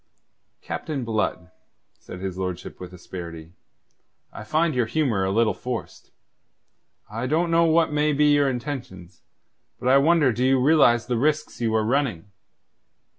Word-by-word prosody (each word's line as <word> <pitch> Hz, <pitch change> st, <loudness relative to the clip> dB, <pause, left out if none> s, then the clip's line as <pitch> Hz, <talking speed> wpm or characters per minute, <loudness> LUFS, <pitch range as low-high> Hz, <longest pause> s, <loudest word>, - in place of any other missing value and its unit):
"Captain 145 Hz, -5 st, -4 dB
Blood," 105 Hz, -5 st, -2 dB, 0.5 s
said 90 Hz, -, -10 dB
his 95 Hz, -2 st, -4 dB
lordship 90 Hz, -2 st, -5 dB
with 90 Hz, -1 st, -9 dB
asperity, 85 Hz, -2 st, -9 dB, 0.8 s
"I -, -, -8 dB
find 155 Hz, +8 st, +1 dB
your 125 Hz, -3 st, 0 dB
humour 115 Hz, -6 st, 0 dB
a 95 Hz, -, 0 dB
little 110 Hz, +3 st, +2 dB
forced. 125 Hz, -2 st, -7 dB, 1.0 s
I 115 Hz, +4 st, -4 dB
don't 165 Hz, +4 st, 0 dB
know 165 Hz, 0 st, +4 dB
what 160 Hz, -1 st, +2 dB
may 150 Hz, +1 st, +2 dB
be 150 Hz, 0 st, +3 dB
your 145 Hz, -1 st, +3 dB
intentions; 120 Hz, -, -6 dB, 0.6 s
but 125 Hz, -, -5 dB
I 135 Hz, +1 st, +6 dB
wonder 150 Hz, -3 st, +3 dB
do 120 Hz, +3 st, -2 dB
you 130 Hz, 0 st, +3 dB
realize 125 Hz, -4 st, +4 dB
the 125 Hz, -2 st, -1 dB
risks 150 Hz, 0 st, -1 dB
you 110 Hz, -1 st, 0 dB
are 110 Hz, -1 st, +1 dB
running." 115 Hz, -, -1 dB
125 Hz, 150 wpm, -24 LUFS, 100-150 Hz, 1.0 s, I